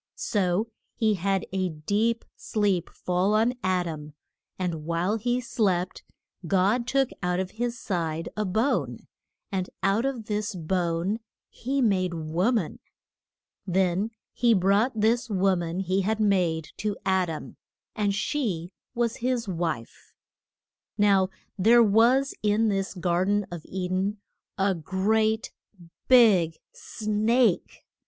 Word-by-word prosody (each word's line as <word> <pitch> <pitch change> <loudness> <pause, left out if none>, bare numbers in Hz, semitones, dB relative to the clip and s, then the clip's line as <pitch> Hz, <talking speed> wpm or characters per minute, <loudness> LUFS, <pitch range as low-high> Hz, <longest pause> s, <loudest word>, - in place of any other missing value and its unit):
So 205 +1 0 0.2
he 220 -2 +2
had 195 0 0
a 185 -1 0
deep 205 +9 -1
sleep 200 -5 0
fall 185 +4 0
on 225 +3 +3
Ad 185 -1 +1
am, 150 -2 -7 0.4
and 175 -4 -3
while 170 +6 0
he 245 +3 0
slept 190 -7 -1 0.5
God 200 +7 +2
took 270 0 +1
out 180 0 0
of 190 0 -3
his 235 +1 -3
side 165 -4 -2
a 215 - -1
bone, 215 +8 -1 0.5
and 185 -2 -2
out 195 +4 +2
of 250 -5 -4
this 210 0 -2
bone 175 +3 -1 0.3
he 270 +2 -2
made 185 -5 +1
a - - -4
wo 165 +8 0
man. 215 -10 -1 0.9
Then 190 +3 +1 0.2
he 235 -2 +3
brought 205 +5 +2
this 230 +3 +2
wo 195 -1 +2
man 175 +1 -3
he 190 +1 0
had 215 +3 -1
made 180 -7 +1
to 210 -1 -2
Ad 190 -2 +2
am, 160 - -7 0.4
and 205 -2 0
she 200 - -2 0.2
was 235 -1 0
his 245 -2 -1
wife. 165 -10 -4 0.8
Now 200 -3 +4 0.3
there 235 +5 +6
was 235 +6 +4
in 215 +1 +2
this 195 -1 -2
gar 175 0 +1
den 205 +1 +1
of 175 -2 -6
E 185 -1 -4
den 190 +3 -1 0.4
a 195 0 +2
great 215 +6 0 0.6
big 200 -11 +5 0.2
snake. 215 0 0
195 Hz, 135 wpm, -26 LUFS, 180-220 Hz, 0.9 s, there